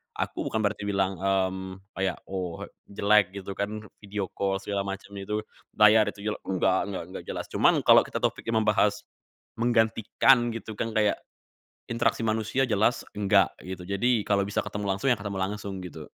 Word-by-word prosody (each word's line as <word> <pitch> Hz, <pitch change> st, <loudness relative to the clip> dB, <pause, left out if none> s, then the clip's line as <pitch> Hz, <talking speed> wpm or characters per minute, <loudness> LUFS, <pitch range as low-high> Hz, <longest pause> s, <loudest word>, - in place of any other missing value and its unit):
aku -, -, -3 dB
bukan 110 Hz, 0 st, -1 dB
berarti 105 Hz, 0 st, -1 dB
bilang, 95 Hz, -1 st, 0 dB
mmm, 95 Hz, 0 st, -1 dB
kayak, 95 Hz, -1 st, -1 dB, 0.2 s
"Oh, 90 Hz, -3 st, -4 dB, 0.2 s
jelek," 100 Hz, -1 st, +3 dB
gitu, 100 Hz, 0 st, -6 dB
kan, 105 Hz, +1 st, -3 dB, 0.2 s
video 100 Hz, -2 st, -4 dB
call 95 Hz, -1 st, -1 dB
segala 100 Hz, -1 st, -2 dB
macam 100 Hz, +1 st, -6 dB
itu, 105 Hz, +2 st, -3 dB, 0.3 s
layar 105 Hz, +1 st, +6 dB
itu 100 Hz, -, -6 dB
jelek, -, -, -5 dB
enggak, 95 Hz, 0 st, +2 dB
enggak 95 Hz, -3 st, -4 dB
enggak, -, -, -7 dB
jelas, -, -, -4 dB
cuman -, -, +4 dB
kalo -, -, +6 dB
kita -, -, -5 dB
topiknya 115 Hz, 0 st, -1 dB
membahas 105 Hz, -1 st, +2 dB, 0.6 s
menggantikan, 120 Hz, +1 st, +3 dB
gitu, 110 Hz, -1 st, -6 dB
kan, 115 Hz, -, -1 dB
kayak 105 Hz, -1 st, +2 dB, 0.7 s
interaksi 115 Hz, 0 st, +1 dB
manusia 110 Hz, +4 st, +1 dB
jelas 110 Hz, +3 st, +2 dB, 0.2 s
enggak, 100 Hz, -2 st, +4 dB, 0.2 s
gitu. 90 Hz, -1 st, -6 dB
Jadi 115 Hz, +3 st, +2 dB
kalo 100 Hz, -1 st, +2 dB
bisa 100 Hz, -, -1 dB
ketemu 105 Hz, -1 st, -4 dB
langsung, 135 Hz, -, 0 dB
ya 120 Hz, -, +3 dB
ketemu 100 Hz, -1 st, -5 dB
langsung 100 Hz, 0 st, -3 dB
gitu. 90 Hz, -, -8 dB
100 Hz, 165 wpm, -27 LUFS, 95-110 Hz, 0.7 s, layar